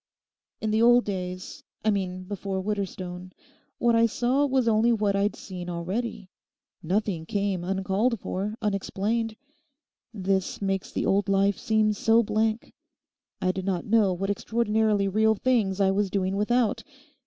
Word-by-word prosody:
In 215 - -1
the 220 +1 +2
old 240 +1 +6
days—I 185 +2 -4
mean 185 -2 -2
before 195 0 -4
Widderstone, 185 -2 -4 0.4
what 235 -1 +2
I 230 0 +5
saw 255 +5 +1
was 260 -3 +1
only 225 +1 +4
what 210 -3 +1
I'd 200 +1 +1
seen 180 -2 -7
already. 185 +3 -4 0.5
Nothing 180 -2 -1
came 200 -4 -1
uncalled 195 +5 0
for, 200 +4 -3
unexplained. 215 +2 -1 0.8
This 195 -3 -1
makes 195 -1 -2
the - - -2
old 200 +1 +1
life 195 0 +2
seem 215 -1 +2
so 225 +2 +3
blank; 220 +1 -1 0.7
I 185 - +3
did 190 0 -5
not 185 -3 -1
know 210 -2 +3
what 195 +3 -1
extraordinarily 215 -1 +1
real 220 +3 +3
things 210 -4 +1
I 195 -1 +4
was 200 0 0
doing 190 -1 -1
without. 230 +3 +1
205 Hz, 145 wpm, -26 LUFS, 190-220 Hz, 0.8 s, old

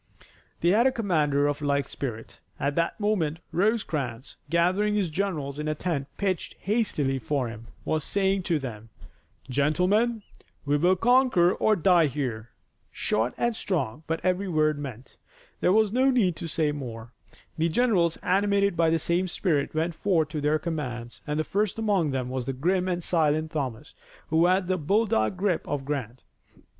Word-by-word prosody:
They 170 - +3
had 225 +7 +5
a - - +3
commander 155 - +1
of 145 0 -1
like 140 -1 0
spirit. 115 -5 -6 0.2
At 145 0 0
that 170 +5 0
moment 190 -8 0
Rosecrans, 155 - -1
gathering 185 +6 +2
his 195 -5 +1
generals 150 -6 -2
in 150 - -3
a 155 - 0
tent 150 -7 -2
pitched 190 -3 -2
hastily 185 - 0
for 135 -1 -1
him, 115 0 -10 0.2
was 155 -1 0
saying 195 +2 +1
to 165 - +3
them, 115 -5 -7 0.6
"Gentlemen, 180 - +1 0.4
we 145 0 +2
will 175 +5 +3
conquer 240 -4 +4
or 220 - +2
die 175 -3 +4
here." 125 -5 -4 0.4
Short 110 +3 -1
and 235 -1 0
strong, 150 - -2
but 165 0 -1
every 185 +2 +1
word 155 -3 +1
meant. 130 -3 -8 0.4
There - - +3
was 215 0 +3
no 260 +2 +4
need 210 -10 +2
to 170 - -5
say 155 -1 +1
more. 120 -4 -7 0.5
The 165 +1 +2
generals 175 -5 +2
animated 200 +1 +2
by 165 -1 +3
the 165 - +3
same 170 +3 0
spirit 155 -6 -1
went 165 +2 0
forth 165 -4 +1
to 155 -1 -4
their 150 +2 +2
commands, 125 -8 -5
and 150 +1 -1
first 210 +1 -1
among 205 -7 +1
them 130 -2 -2
was 130 -1 -3
the 135 - -1
grim 180 +7 0
and 175 -1 -2
silent 155 -2 +1
Thomas, 135 -8 -4 0.4
who 165 +2 +4
had 185 0 +2
the 185 -1 0
bulldog 190 - +1
grip 185 -3 +1
of 140 -2 -3
Grant. 130 -4 -4
160 Hz, 170 wpm, -26 LUFS, 140-195 Hz, 0.6 s, had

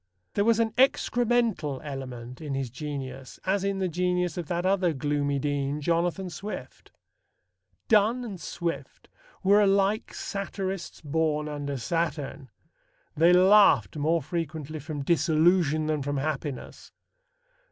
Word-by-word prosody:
There 200 - +2
was 230 0 +4
an 225 -1 +2
excremental 240 - +2
element 130 -3 -7
in 145 -3 -4
his 135 -3 -3
genius 135 -1 -6
as 190 +1 +1
in 195 0 0
the 190 -1 0
genius 180 0 0
of 175 -3 -4
that 175 +2 -2
other 185 -3 +2
gloomy 145 0 0
dean, 145 +1 -1
Jonathan 175 +4 0
Swift. 200 +7 -8 1.0
Donne 225 +3 +3
and 195 -6 -7
Swift 170 -1 -5 0.3
were 200 +2 +5
alike 200 +1 +2
satirists 195 -2 -4
born 150 0 0
under 145 -2 -4
Saturn. 145 -1 -3 0.7
They 165 +3 +5
laughed 185 - +6
more 160 +2 +1
frequently 155 -1 -4
from 145 -1 -5
disillusion 160 0 +3
than 155 -1 0
from 145 +1 -2
happiness. 145 -1 -4
160 Hz, 125 wpm, -27 LUFS, 145-190 Hz, 1.0 s, laughed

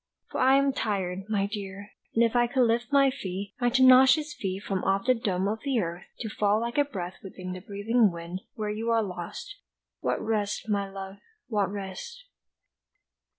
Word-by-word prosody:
For - - -3
I 260 +1 +6
am 275 0 +2
tired, 195 -4 -2
my 200 -2 +1
dear, 200 -1 -6 0.2
and 230 - +5
if 230 +1 +1
I 240 0 +4
could 255 +1 +2
lift 235 +3 0
my 275 -1 +5
feet, 200 -5 -5
My 245 - +4
tenacious 260 +4 +6
feet 195 -6 -4
from 195 -2 -2
off 195 +1 +1
the 255 - +5
dome 195 -5 -1
of 215 +2 -1
the 270 -4 +1
earth 170 -2 -3 0.2
To 225 - -3
fall 210 0 +2
like 235 +4 -1
a - - +6
breath 185 -9 -6
within 185 -1 -7
the 185 - -6
breathing 210 +3 +2
wind 170 +2 -6
Where 215 -3 -2
you 225 +2 -3
are 230 -1 +3
lost, 190 - -7 0.4
what - - -1
rest, 215 -1 -1
my 200 -2 0
love, 195 0 -8 0.3
what 205 -4 +1
rest! 205 - -7
210 Hz, 190 wpm, -27 LUFS, 195-245 Hz, 0.4 s, I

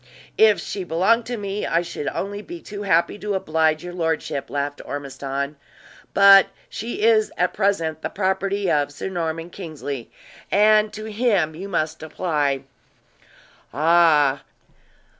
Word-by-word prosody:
"If 215 -2 +6
she 195 - -5
belonged 190 +8 +2
to 245 0 -3
me 200 0 -4
I 170 +1 +1
should 170 -4 -6
only 205 +1 -3
be 345 +10 -9
too 205 -9 -8
happy 190 +1 +1
to 205 0 -2
oblige 160 -3 +1
your 175 0 -7
lordship," 160 -5 -2
laughed 145 0 -3
Ormiston; 140 0 -5 0.6
"but 195 -1 +8 0.2
she 225 -1 -5
is 220 -1 +4
at 180 0 +1
present 165 -6 0
the - - -3
property 195 0 -1
of 145 -1 +1
Sir 145 - -5
Norman 165 -1 -3
Kingsley, 145 -9 -6 0.4
and 215 +1 +4
to 215 0 -7
him 210 -7 +1
you 190 +5 -7
must 155 -3 -2
apply." 150 -4 -1 1.1
"Ah! 155 -4 +4
175 Hz, 140 wpm, -22 LUFS, 155-205 Hz, 1.1 s, but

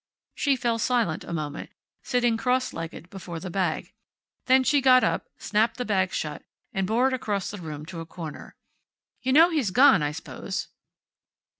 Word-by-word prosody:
She 280 -2 +1
fell 235 -2 -1
silent 230 -9 0
a - - -8
moment, 150 -3 -4 0.3
sitting 240 -2 +1
cross 255 +2 0
legged 165 +1 -7
before 175 -4 -7
the 185 +1 -6
bag. 180 -3 -2 0.5
Then 260 0 +5
she 285 +2 +3
got 255 -1 +6
up, - - 0
snapped 225 +2 +1
the 250 - -3
bag 190 -3 +1
shut, 150 -1 -4 0.3
and 190 -1 -1
bore 245 +5 +3
it - - -4
across 205 -6 -2
the 205 - -7
room 150 -2 -7
to 170 +1 -8
a 165 - -6
corner. 165 -3 -8 0.7
"You 260 - 0
know 325 +6 +7
he's 290 - +1
gone, 250 - +6
I 145 0 0
s'pose." 150 - -6
210 Hz, 175 wpm, -26 LUFS, 170-255 Hz, 0.7 s, know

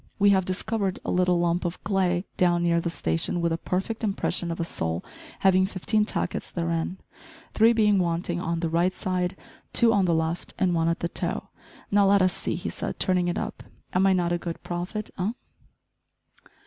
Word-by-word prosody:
We 205 0 +5
have 190 -2 +3
discovered 195 +1 -1
a - - -1
little 180 -1 +2
lump 175 0 +1
of 175 0 -4
clay 185 -2 +1
down 175 -1 +2
near 170 0 +2
the 170 - -2
station, 80 - -1
with 170 -1 +1
a 165 - 0
perfect 195 +7 -2
impression 195 -4 -1
of 165 - -4
a - - +1
sole 80 - -3 0.4
having 190 -1 +4
fifteen 210 +2 0
tackets - - -3
therein, 170 +1 -2 0.6
three 225 +2 +5
being 210 -3 +3
wanting 175 0 -1
on 170 -1 -2
the 165 - 0
right, 175 +3 +2
side, 185 -1 -1 0.4
two 230 -1 +5
on 200 -3 +3
the 170 -2 +2
left, 160 +1 -2
and 180 -2 +2
one 165 -1 +1
at 165 0 0
the 170 - 0
toe - - -3 0.4
now, 200 -1 +5
let 200 -1 +5
us 185 0 +2
see," - - -2
he - - -4
said, - - -5
turning 180 -2 +2
it 175 - -1
up, - - -4 0.3
"am 190 +1 +4
I 190 - +5
not 175 -2 +1
a 175 - 0
good 170 -1 -6
prophet 180 +5 -4
eh?" 195 +5 0
180 Hz, 200 wpm, -26 LUFS, 170-195 Hz, 0.6 s, We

